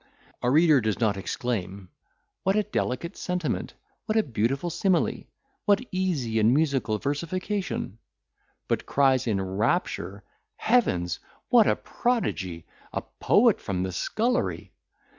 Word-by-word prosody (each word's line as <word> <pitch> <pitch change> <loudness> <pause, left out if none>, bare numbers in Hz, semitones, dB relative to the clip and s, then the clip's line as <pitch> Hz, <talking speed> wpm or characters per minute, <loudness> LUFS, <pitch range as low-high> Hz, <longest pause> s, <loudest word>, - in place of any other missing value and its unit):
A 120 - +1
reader 155 0 +5
does 110 -2 -1
not 110 -4 +2
exclaim, 95 -2 -3 0.5
"What 190 +1 +1
a 215 - +3
delicate 170 -3 -2
sentiment! 180 -7 -3 0.3
what 215 - +1
a 220 - +4
beautiful 135 - -1
simile! 185 +1 +1 0.4
what 205 +4 +3
easy 155 -12 0
and 110 +4 +4
musical 135 -8 +1
versification!"—but 170 - -4
cries 135 -3 +3
in 105 -4 +1
rapture, 100 - -1 0.3
"Heavens! 90 - +1 0.3
what 235 -4 +6
a - - +4
prodigy 95 - -2 0.3
a - - -3 0.2
poet - - +4
from 90 -2 -2
the 95 - -2
scullery! 230 - -1
135 Hz, 120 wpm, -26 LUFS, -, 0.5 s, what